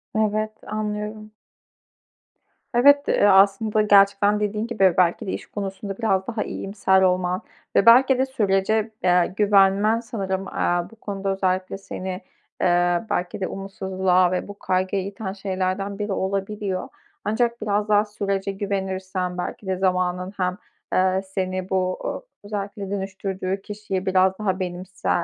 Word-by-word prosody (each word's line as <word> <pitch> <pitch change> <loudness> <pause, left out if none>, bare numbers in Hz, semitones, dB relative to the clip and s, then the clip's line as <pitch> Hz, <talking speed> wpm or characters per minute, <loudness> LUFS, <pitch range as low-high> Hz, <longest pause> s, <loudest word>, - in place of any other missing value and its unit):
Evet, 215 0 +1 0.2
anlıyorum. 215 0 -4 1.4
Evet, 285 +4 +6
eee, - - +3
aslında 205 +2 +4
gerçekten 205 0 +4
dediğin 210 +1 -1
gibi 195 -6 +3
belki 175 -2 +2
de - - -1
iş - - -5
konusunda 195 -1 -5
biraz 195 -5 0
daha 225 -3 -2
iyimser 195 -1 +1
olman 180 0 +1 0.3
ve 200 - +4
belki 255 +3 +7
de 260 - +2
sürece, 215 -2 +1
eee, 180 0 +3
güvenmen 205 +2 +4
sanırım, 195 -5 -3
eee, 175 -2 -1
bu - - -15
konuda 200 -3 -4
özellikle 185 0 -1
seni, 190 -1 -6 0.4
eee, 175 0 +2
belki 180 +2 -2
de 185 - 0
umutsuzluğa 190 -2 0
ve 185 - -2
bu 205 0 -10
kaygıya 185 +1 0
iten 195 0 -5
şeylerden 195 +1 -3
biri 205 -1 -2
olabiliyor. 195 0 -2 0.4
Ancak 235 +2 0
biraz 210 0 0
daha 210 0 +4
sürece 200 -2 -2
güvenirsen 190 -2 -3
belki 190 +2 -5
de 190 -1 0
zamanın 185 0 0
hem, 180 0 -1 0.4
eee, 185 0 +2
seni 185 -1 -3
bu, 185 -1 0
ııı, - - -3 0.2
özellikle 200 -1 -5
dönüştürdüğü 195 -1 -3
kişiyi 205 -2 -4
biraz 190 0 +2
daha 190 -3 -1
benimse 185 +1 -5
195 Hz, 140 wpm, -23 LUFS, 185-210 Hz, 1.4 s, belki